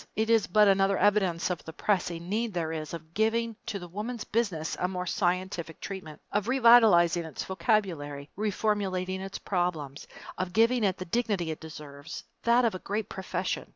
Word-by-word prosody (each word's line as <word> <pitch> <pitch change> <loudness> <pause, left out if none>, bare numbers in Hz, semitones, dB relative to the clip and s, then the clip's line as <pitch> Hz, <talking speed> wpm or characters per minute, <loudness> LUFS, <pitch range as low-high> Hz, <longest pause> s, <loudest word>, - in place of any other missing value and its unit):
It 220 +1 +1
is 225 -2 +4
but 210 +3 +5
another 195 0 +3
evidence 190 -4 +2
of 175 - -4
the 160 - -9
pressing 175 -3 -1
need 215 +1 -1
there 165 -2 -1
is 155 -1 -4
of 160 0 -12
giving 225 +2 +1
to 220 -3 -2
the 175 -2 -8
Woman's 215 +6 -5
Business 200 -9 -1
a 180 - +1
more 180 -1 -3
scientific 180 -3 -1
treatment 185 -6 -7
of 205 +1 0
revitalizing 225 -10 +6
its 160 -4 -6
vocabulary, 170 -7 -1
reformulating 195 -3 -1
its 195 +1 -5
problems, 165 -7 -2 0.3
of 185 -1 -2
giving 230 +2 +3
it 190 -2 +1
the 185 - -6
dignity 200 -4 0
it 155 - -6
deserves, 150 -1 -9 0.2
that 235 +1 +4
of 225 - +2
a 185 - -5
great 210 +2 -3
profession. 190 - -3
190 Hz, 175 wpm, -28 LUFS, 170-215 Hz, 0.3 s, revitalizing